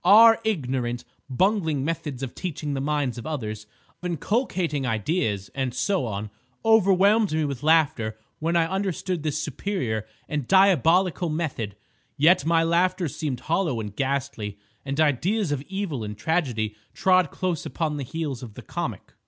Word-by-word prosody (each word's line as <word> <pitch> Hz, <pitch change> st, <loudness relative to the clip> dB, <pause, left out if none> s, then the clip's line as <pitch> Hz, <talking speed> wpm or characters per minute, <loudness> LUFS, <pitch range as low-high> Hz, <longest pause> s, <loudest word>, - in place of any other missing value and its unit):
Our 225 Hz, +2 st, +8 dB
ignorant, 130 Hz, -, -1 dB, 0.2 s
bungling 160 Hz, -, +1 dB
methods 150 Hz, -5 st, -3 dB
of 130 Hz, -, -4 dB
teaching 150 Hz, -5 st, -4 dB
the 135 Hz, -, -2 dB
minds 140 Hz, -4 st, -1 dB
of 120 Hz, -, -7 dB
others, 110 Hz, -8 st, -4 dB, 0.3 s
of 180 Hz, -, -3 dB
inculcating 175 Hz, -, -1 dB
ideas, 110 Hz, -, -1 dB
and 130 Hz, -3 st, -2 dB
so 190 Hz, -7 st, 0 dB
on, 105 Hz, 0 st, -4 dB, 0.3 s
overwhelmed 205 Hz, -1 st, +5 dB
me 155 Hz, -1 st, +1 dB
with 140 Hz, -3 st, -4 dB
laughter 145 Hz, -9 st, +2 dB, 0.2 s
when 165 Hz, +2 st, 0 dB
I 170 Hz, -1 st, +4 dB
understood 185 Hz, -1 st, -2 dB
this 150 Hz, -1 st, -1 dB
superior 150 Hz, -, -2 dB, 0.2 s
and 145 Hz, -5 st, -3 dB
diabolical 180 Hz, -2 st, +4 dB
method. 145 Hz, -10 st, -3 dB, 0.4 s
Yet 165 Hz, +4 st, +4 dB
my 165 Hz, 0 st, +4 dB
laughter 175 Hz, +2 st, +2 dB
seemed 140 Hz, -4 st, -4 dB
hollow 160 Hz, -7 st, 0 dB
and 105 Hz, -2 st, -6 dB
ghastly, 130 Hz, -7 st, -2 dB, 0.3 s
and 140 Hz, +2 st, -3 dB
ideas 165 Hz, -, +2 dB
of 145 Hz, -2 st, -1 dB
evil 190 Hz, -, -3 dB
and 105 Hz, -1 st, -6 dB
tragedy 120 Hz, -8 st, -1 dB, 0.2 s
trod 185 Hz, -4 st, +4 dB
close 180 Hz, -2 st, -2 dB
upon 155 Hz, -3 st, -2 dB
the 140 Hz, -, -3 dB
heels 145 Hz, -2 st, -4 dB
of 115 Hz, -5 st, -9 dB
the -, -, -9 dB
comic. -, -, -5 dB
155 Hz, 155 wpm, -25 LUFS, 125-180 Hz, 0.4 s, Our